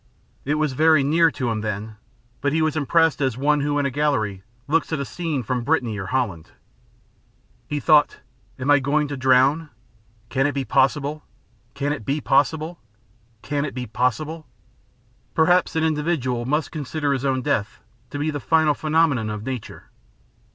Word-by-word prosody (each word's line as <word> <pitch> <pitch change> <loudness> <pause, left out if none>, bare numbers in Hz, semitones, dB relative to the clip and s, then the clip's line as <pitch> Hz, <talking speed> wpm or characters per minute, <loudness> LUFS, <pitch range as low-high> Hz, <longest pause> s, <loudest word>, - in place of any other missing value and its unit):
It 145 +2 +1
was 155 -3 0
very 155 +1 +4
near 165 +4 +4
to 125 -6 -3
him 110 -1 -2
then, 105 +1 -4 0.5
but 140 +1 0
he 160 0 +2
was 155 -1 0
impressed 160 +1 +2
as 130 -4 0
one 145 +2 +2
who 145 0 0
in 145 - +1
a 140 - 0
gallery 125 -9 0 0.3
looks 165 +3 +1
at 160 - -1
a 140 - -2
scene 160 -4 -3
from 125 +1 -2
Brittany 125 -6 0
or 95 - -5
Holland. 105 -9 -2 1.2
He 150 - -2
thought: 150 -1 +4 0.4
"I 130 - -6
am 145 +1 +4
going 150 +2 +1
to 145 - -3
drown? 130 +4 +3 0.6
Can 135 +1 +1
it 145 - -2
be 135 -1 -2
possible 145 +5 +1 0.5
Can 145 +1 -1
it 140 - -6
be 140 +7 -1
possible? 155 +4 +1 0.6
Can 145 0 -1
it 145 - -5
be 125 -1 -4
possible?" 125 +8 -2 0.9
Perhaps 175 +2 +3
an 160 - +1
individual 150 -6 -1
must 150 +3 0
consider 150 -1 -2
his 135 -1 -3
own 130 -2 0
death 115 -8 -1 0.3
to 145 - -6
be 150 +2 -1
the 145 - -4
final 160 0 +3
phenomenon 155 -8 +1
of 105 0 -5
nature. 130 -2 -7
145 Hz, 170 wpm, -22 LUFS, 130-155 Hz, 1.2 s, very